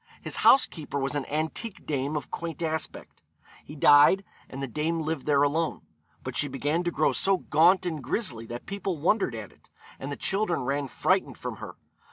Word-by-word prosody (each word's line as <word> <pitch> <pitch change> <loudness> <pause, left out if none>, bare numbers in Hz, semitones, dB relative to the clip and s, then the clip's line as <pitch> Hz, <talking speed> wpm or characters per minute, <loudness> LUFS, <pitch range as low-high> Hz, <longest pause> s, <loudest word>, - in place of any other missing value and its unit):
His - - -3
housekeeper 160 - +3
was 135 0 -1
an 145 -2 -2
antique 160 +8 -3
dame 145 0 -2
of 145 - -7
quaint 170 0 -5
aspect. 160 -1 -4 0.4
He 150 - -11
died, 145 +6 +6 0.3
and 135 - -8
the 135 - -2
dame 160 +6 -1
lived 155 -2 -3
there 145 -1 +4
alone; 160 +3 0 0.4
but - - -5
she 145 - +1
began 145 +5 -1
to - - +2
grow 155 -2 +2
so 195 0 +2
gaunt 175 +3 +3
and 160 -5 -3
grizzly 115 - -2
that 120 +1 -7
people 195 -2 -3
wondered 165 - +1
at 110 -3 -7
it, - - -26 0.3
and 135 +2 -5
the - - -3
children 190 -4 -1
ran 140 +2 -1
frightened - - 0
from - - -6
her. - - -8
155 Hz, 190 wpm, -27 LUFS, 140-170 Hz, 0.4 s, died